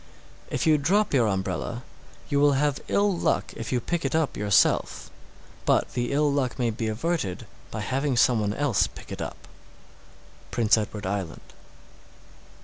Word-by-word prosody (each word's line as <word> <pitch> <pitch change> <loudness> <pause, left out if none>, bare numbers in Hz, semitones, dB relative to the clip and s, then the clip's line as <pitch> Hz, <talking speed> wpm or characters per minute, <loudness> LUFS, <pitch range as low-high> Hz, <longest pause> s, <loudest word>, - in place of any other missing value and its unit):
_ - - -25 0.4
706. - - -6
If - - 0
you 155 -1 +5
drop 195 +8 +2
your 120 -5 +4
umbrella, 95 +4 -2 0.4
you 140 - +1
will 145 0 +5
have 140 +1 +1
ill 200 -1 +2
luck - - 0
if 115 - -6
you 125 - +2
pick 175 +8 -2
it - - -1
up 160 -4 +1
yourself; 100 -1 +2 0.5
but - - +1
the 120 0 -1
ill 145 +1 +2
luck 130 -3 -1
may 120 -3 +1
be 110 0 -3
averted 110 - -2 0.2
by 110 - -5
having 130 +4 -1
some 120 -1 +4
one 105 0 -1
else 140 -8 +2
pick - - -13
it - - -5
up. - - -7 1.0
_Prince 115 -3 +4
Edward 105 -2 -4
Island. 95 -3 -4
125 Hz, 170 wpm, -26 LUFS, 105-145 Hz, 1.0 s, you